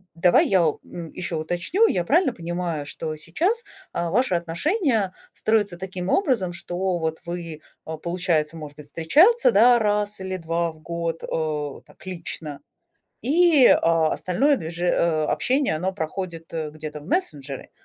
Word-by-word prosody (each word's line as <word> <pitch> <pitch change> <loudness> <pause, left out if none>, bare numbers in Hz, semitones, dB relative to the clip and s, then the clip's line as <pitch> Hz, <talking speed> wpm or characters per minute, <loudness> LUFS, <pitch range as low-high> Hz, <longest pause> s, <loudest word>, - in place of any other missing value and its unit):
давай 175 +1 +4
я, 190 - +4 0.2
м, 170 -2 -8
еще 175 -2 -3
уточню. 175 - +1
Я 180 - 0
правильно 300 - +3
понимаю, 170 -5 -3
что 155 +2 -5
сейчас, 340 - -1 0.3
а, 170 - -1
ваши 235 -2 +2
отношения 205 - 0 0.2
строятся 205 -5 0
таким 185 0 -5
образом, 250 - +1
что 180 +1 -2
вот 160 -1 -2
вы, 170 -3 -5 0.2
а, 160 0 -5
получается, 170 -2 -1
может 150 -2 -9
быть, 150 - -10
встречаться, 345 - +4
да, 245 - +6
1 210 -1 0
или 190 0 -4
2 165 0 -1
в 155 - -19
год, 170 0 -4
э, 150 -3 -3
так - - -18
лично, 165 -5 -6 0.6
и, 310 -1 +5
а, 165 -1 +4
остальное 270 +11 +2
движе 170 -4 -4
э, 165 -3 +2
общение 260 - +1
оно 180 +5 -1
проходит, 170 -2 -5
э, 160 -2 -3
где-то 150 -1 -7
в - - -14
мессенджере? 145 - -3
175 Hz, 150 wpm, -24 LUFS, 160-210 Hz, 0.6 s, да